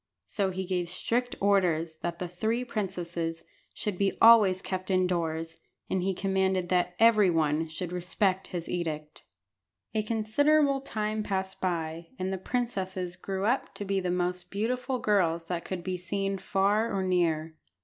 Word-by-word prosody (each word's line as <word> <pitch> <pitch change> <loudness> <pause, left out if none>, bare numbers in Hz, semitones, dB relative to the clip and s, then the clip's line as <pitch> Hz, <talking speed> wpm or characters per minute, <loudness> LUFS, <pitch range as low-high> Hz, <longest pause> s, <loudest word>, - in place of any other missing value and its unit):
So 195 -2 -1
he 190 0 -3
gave 180 -2 -1
strict 240 +7 0
orders 170 -5 +2
that 170 +1 -4
the 180 - -4
three 220 +8 -1
princesses 175 -7 -3 0.3
should 205 -4 -4
be 195 -1 +1
always 215 -5 +7
kept 185 0 -4
indoors, 170 -3 0 0.3
and 190 - +1
he 190 +1 0
commanded 190 -1 0
that 180 -1 +1
every 215 -4 +6
one 160 -1 +1
should 165 +2 -5
respect 185 +2 0
his 175 -3 -5
edict. 155 -3 -4 0.7
A 220 - +1
considerable 275 +7 +2
time 215 -4 -2
passed 190 -2 -3
by, 165 -2 -2
and 185 +1 -2
the 190 - -3
princesses 190 -6 -2
grew 190 +1 -3
up 245 +5 0
to 205 - -5
be 195 0 0
the 180 -1 -2
most 180 0 -1
beautiful 250 +5 -1
girls 170 -7 +1
that 175 -2 -3
could 185 -2 -4
be 185 0 -2
seen 195 +2 -2
far 200 +4 +1
or 195 -2 0
near. 165 -4 +1
185 Hz, 160 wpm, -29 LUFS, 175-205 Hz, 0.7 s, always